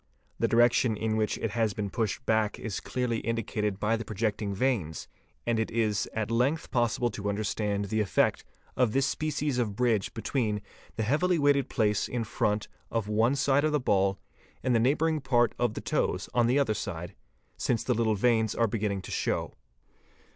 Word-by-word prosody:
'The - - +2
direction 120 -1 +3
in 110 0 -1
which 110 -1 0
it 115 - -2
has 110 -3 0
been 105 -1 -2
pushed 115 +2 -2
back 110 -1 +1
is 110 -4 -4
clearly 125 -3 -2
indicated 105 -3 -2
by 110 +2 +2
the 115 - -4
projecting 105 -1 -2
veins, 100 -7 -1 0.4
and 115 -1 +1
it 110 - 0
is 110 -2 0
at 110 0 -2
length 130 +7 +1
possible 120 0 +1
to 105 -1 -3
understand 100 0 -1
the 110 +2 0
effect 100 - +1 0.3
of 125 -4 +2
this 135 0 +3
species 145 -2 -1
of 105 -5 -1
bridge 115 -4 +1
between 115 -2 -1 0.4
the 110 - -1
heavily 170 +10 +2
weighted 145 -2 +3
place 105 -4 +1
in 120 -2 -2
front 105 -1 -1 0.2
of 115 -3 -2
one 110 +5 +2
side 140 0 +2
of 155 - +2
the 150 - +2
ball 100 -5 +2 0.5
and 130 - +2
the 115 - +4
neigh 130 +6 +3
_ - - -11
bouring 160 -1 +1
part 120 -3 +3
of 120 -3 +1
the - - -4
toes - - -1
on 120 -1 +3
the 125 +3 +3
other 140 -6 +2
side, 90 -4 -5 0.4
since 115 -3 0
the 125 - +1
little 110 -2 +1
veins 110 0 +2
are 115 - +3
beginning 100 -3 -2
to - - -8
show. - - -1
115 Hz, 190 wpm, -28 LUFS, 105-125 Hz, 0.5 s, the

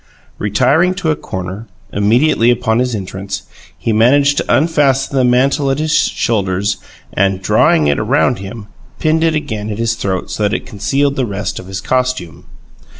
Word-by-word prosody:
Retiring 135 - +2
to 175 -4 0
a - - +1
corner, 95 0 -6 0.3
immediately 115 +4 +3
upon 120 -2 +1
his 125 -2 0
entrance, 95 0 -5 0.3
he 115 - -1
managed 140 +6 +4
to - - -1
unfasten 140 -4 +1
the 130 - +3
mantle 135 +3 +2
at 135 - 0
the 155 +1 -1
shoulders, 100 - 0 0.4
and, 95 -1 +1
drawing 75 - +3
it 70 -1 +1
round 125 +1 +1
him, 100 +2 -8 0.3
pinned 160 +1 +1
it 165 -1 +2
again 110 -8 -3
at 105 - -4
his 115 0 0
throat 95 -4 -3
so - - -4
that 105 +1 +1
it - - -4
concealed 135 +8 -1
the 130 -3 0
rest 100 +1 -4
of 90 - -10
his 95 0 -5
costume. 130 -8 -2
115 Hz, 170 wpm, -15 LUFS, 100-140 Hz, 0.4 s, managed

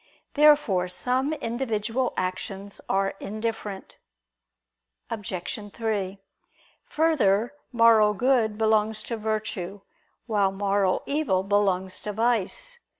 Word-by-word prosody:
Therefore 290 -12 +4
some 255 +9 0
individual 240 -3 -2
actions 195 +2 -4
are 195 0 +1
indifferent. 215 -2 -5 1.1
Obj. 205 -1 -5
3: 205 -4 -2 0.7
Further, 250 -7 +2 0.2
moral 225 -3 +5
good 235 -2 +2
belongs 220 0 +1
to 235 - -4
virtue, 210 -3 -3 0.4
while 205 -4 +2
moral 195 -1 +1
evil 280 -11 0
belongs 190 -2 +1
to 210 - -5
vice. 235 - -1
215 Hz, 90 wpm, -26 LUFS, 195-235 Hz, 1.1 s, moral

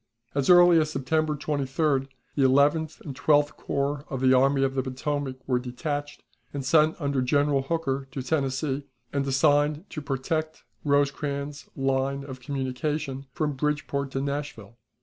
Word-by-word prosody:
As 140 -2 0
early 175 -1 +8
as 155 -1 +1
September 155 +2 0
23d 140 -1 0 0.3
the 145 - 0
Eleventh 145 +4 +3
and 140 -4 -7
Twelfth 145 +1 +3
Corps 140 +1 -2
of 135 - -3
the 130 0 +4
Army 135 +1 +4
of 135 0 +1
the 135 - 0
Potomac 130 +1 -3
were 125 -2 +1
detached, 145 +4 -4 0.3
and 140 -2 -5
sent 155 +3 +3
under 140 -3 0
General 145 +1 +2
Hooker 135 -2 -2
to 135 -1 -5
Tennessee, 135 0 -1 0.3
and 140 -1 0
assigned 145 +5 +2
to 155 - -5
protect 155 +3 -3 0.2
Rosecrans's 140 0 -1
line 135 0 0
of 130 -2 -8
communication 135 +1 -3
from 150 +1 -1
Bridgeport 140 -1 -1
to 135 - -1
Nashville. 140 -6 -5
140 Hz, 150 wpm, -26 LUFS, 135-150 Hz, 0.3 s, early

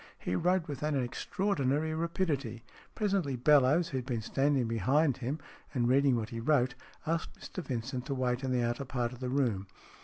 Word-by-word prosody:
He 90 - -2
wrote 180 - +2
with 145 -3 -5
an 150 -2 +1
extra 125 +9 -3
ordinary 155 -4 +1
rapidity. 155 - -1 0.3
Presently 195 - 0
Bellowes, 145 +5 +4
who 135 - -1
had 125 - -7
been 115 -4 -2
standing 135 0 +1
behind 130 - +2
him, 135 +3 -2 0.4
and 120 -2 +2
reading 135 +1 +4
what 110 -2 -2
he 115 - -5
wrote, 125 0 +2 0.3
asked 165 +1 -2
Mr 185 - -6
Vincent 125 0 -3
to 140 - -1
wait 125 0 0
in 130 - -1
the 125 -1 +2
outer 120 +3 -1
part 125 -2 -2
of 125 - -11
the 130 -1 -3
room. 120 -8 0
135 Hz, 190 wpm, -31 LUFS, 120-150 Hz, 0.4 s, Bellowes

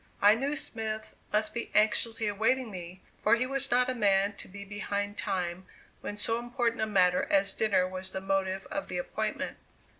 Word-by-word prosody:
I 205 +1 +7
knew 275 +6 -1
Smith 220 -5 -5 0.2
must 215 0 +1
be 235 - -4
anxiously 220 +1 +3
awaiting 225 +4 +1
me, 180 0 -8 0.2
for - - +5
he 245 +2 0
was 275 0 -1
not 250 +1 +3
a 255 - 0
man 200 -3 +3
to - - -9
be 200 +1 -9
behind 205 0 -3
time 185 -3 -2 0.3
when 205 - -5
so 225 +2 0
important 240 -1 -1
a 220 - +1
matter 180 -3 +3
as 195 0 +4
dinner 190 -4 +2
was 185 0 -4
the 190 - -4
motive 190 0 -1
of 295 -1 -3
the - - -4
appointment. - - -3
210 Hz, 185 wpm, -30 LUFS, 195-230 Hz, 0.3 s, I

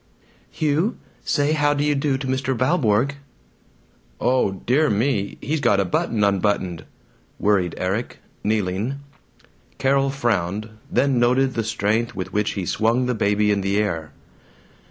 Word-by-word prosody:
"Hugh, 155 +9 0 0.3
say 145 0 +1
how 145 -1 +2
do 145 - 0
you 150 0 +2
do 140 -1 0
to 135 - -6
Mr. 130 0 -1
Valborg." 130 -2 +2 1.0
"Oh, 125 -6 +2
dear 130 +10 +1
me, 105 -1 0
he's 155 +2 -1
got 100 -7 +3
a 100 - +2
button 105 +4 0
unbuttoned," 95 -4 0 0.5
worried 95 -4 +1
Erik, 100 +6 -2 0.3
kneeling. 105 +3 -1 0.8
Carol 135 0 +2
frowned, 110 -6 -1 0.2
then 130 0 +2
noted 130 +2 +3
the 115 - -1
strength 110 +2 -1
with 95 - -5
which 105 0 0
he 95 -3 -3
swung 115 +7 +1
the 125 - 0
baby 105 -1 +2
in 100 -1 +1
the 95 +1 0
air. 80 -7 -1
115 Hz, 140 wpm, -22 LUFS, 100-135 Hz, 1.0 s, got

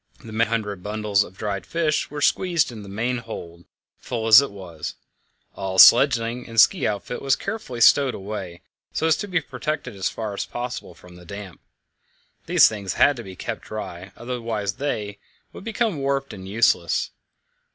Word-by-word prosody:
The 110 - -9
many 115 +1 +1
hundred 105 -5 -2
bundles 105 0 +1
of 95 0 -14
dried 100 -3 -3
fish 160 - -1
were 145 0 -4
squeezed 175 -8 +2
into 110 -3 -9
the 100 - -10
main 120 +5 -1
hold, 85 -7 -9 0.3
full 115 -2 -4
as 110 +3 +9
it 140 - -3
was. 90 -5 -8 0.6
All 95 -1 -4
sledging 120 +1 +6
and 115 -1 0
ski - - +5
outfit 105 +3 -4
was 135 -1 +2
carefully 200 - -5
stowed 135 +2 +5
away, 95 -3 -6 0.3
so - - -1
as 160 -1 +4
to 205 - -4
be 180 -3 +1
protected 135 -2 -4
as 95 -2 -1
far 110 -2 -5
as 100 - -3
possible 120 -7 -6
from 90 0 -15
damp. 100 0 -9 0.9
These - - +7
things 100 -4 -4
had 145 - +4
to 120 - -6
be 95 -2 -10
kept - - -5
dry, 95 -3 -7
otherwise 115 -4 -3
they, 105 -8 -3 0.3
would - - -10
become 225 -4 -1
warped 135 0 -1
and 95 -1 -9
useless. 100 -5 +1
110 Hz, 170 wpm, -23 LUFS, 100-135 Hz, 0.9 s, as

